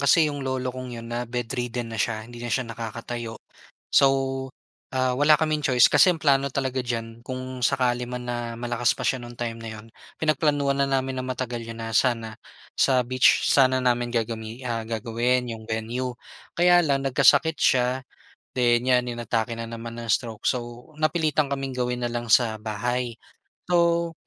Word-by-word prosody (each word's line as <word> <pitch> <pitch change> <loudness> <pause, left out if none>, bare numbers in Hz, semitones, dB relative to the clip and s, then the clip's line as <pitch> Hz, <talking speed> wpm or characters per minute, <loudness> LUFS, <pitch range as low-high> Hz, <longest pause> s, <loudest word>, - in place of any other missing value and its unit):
kasi 155 +3 +5
'yong 145 -1 -4
lolo 130 -1 -2
kong 125 -1 -7
'yon 115 0 -8
na-bedridden 120 0 -3
na 110 - -5
siya, 110 0 -1
hindi 120 0 -11
na 120 - -4
siya 130 +3 0
nakakatayo. 115 0 -6 0.6
So, 135 - +6 0.9
ah, 130 -1 +2
wala 150 +2 +5
kaming 155 -1 0
choice 125 -2 +5
kasi - - +7
ang 160 - -7
plano 140 -2 +3
talaga 130 -1 -2
diyan 115 -2 -4
kung 130 0 -6
sakali 125 -1 +1
man 125 0 -5
na 120 -1 -3
malakas 120 0 0
pa - - -5
siya 130 - +1
nung 120 0 -10
time 115 -1 -4
na 115 - -7
'yon, 110 - -12 0.3
pinagplanuhan 145 -3 +1
na 140 - +3
namin 130 -1 -1
na - - -5
matagal 125 -2 -3
'yon 115 0 -8
na 115 0 -5
sana, 115 -3 +1 0.4
sa 130 -2 +4
beach 130 +1 +3
sana 130 -1 +4
namin 120 -1 +1
gagami 115 +1 -3
ah, 115 -2 -2
gagawin 120 +2 0
'yong 110 -1 -10
venue, 120 +3 -3 0.4
kaya 175 0 +6
lang 135 -2 +1
nagkasakit 155 +4 +4
siya, 125 0 +3 0.5
then 120 -1 +2
'yan 125 -1 +3
inatake 115 0 -2
na 115 - -4
naman 115 0 -7
ng 115 -1 -7
stroke 115 -1 -1
so, 120 +3 -3
napilitan 155 -3 +1
kaming 135 -1 -3
gawin 125 -1 -2
na - - -1
lang 120 -1 -4
sa 110 -1 +4
bahay. 120 +3 -2 0.5
So, 170 -1 +2
125 Hz, 175 wpm, -25 LUFS, 115-130 Hz, 0.9 s, kasi